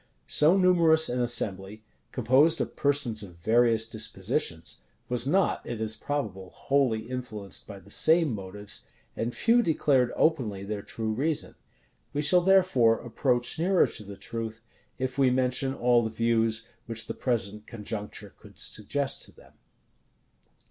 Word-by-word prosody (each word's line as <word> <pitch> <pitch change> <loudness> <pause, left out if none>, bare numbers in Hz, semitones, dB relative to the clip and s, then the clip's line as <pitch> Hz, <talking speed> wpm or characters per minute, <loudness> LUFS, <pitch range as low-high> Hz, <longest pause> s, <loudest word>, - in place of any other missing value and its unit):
So 155 - +4
numerous 170 -4 +4
an 125 +1 -1
assembly, 105 -3 -1 0.3
composed 135 +7 +3
of - - -3
persons 140 -7 0
of 95 -4 -10
various 115 +5 +3
dispositions, 110 - -2 0.3
was 125 0 0
not, 190 +6 +1
it 120 -2 -6
is 110 0 0
probable, 105 -11 -4
wholly 135 -4 0
influenced 110 -6 -5
by 100 - -9
the 100 - -14
same 160 -1 +3
motives; 100 0 -6 0.3
and 120 +2 -3
few 235 +1 +4
declared 140 - +2
openly 115 -12 +1
their 105 +1 -4
true 110 +1 -4
reason. 150 +6 -1 0.6
We 145 +1 -1
shall, 180 +4 +5
therefore, 175 -12 +4
approach 120 +3 0
nearer 185 +2 +4
to 105 - -6
the 100 -1 -10
truth, 115 -1 -5 0.4
if 130 +1 -3
we 135 -2 +5
mention 130 +1 0
all 120 0 +3
the 110 - -2
views 115 0 0 0.2
which 115 -1 -3
the - - -5
present 105 -4 -3
conjuncture 105 -2 -6
could - - -16
suggest 135 +7 -1
to - - -17
them. - - -20
120 Hz, 145 wpm, -27 LUFS, 110-140 Hz, 0.6 s, shall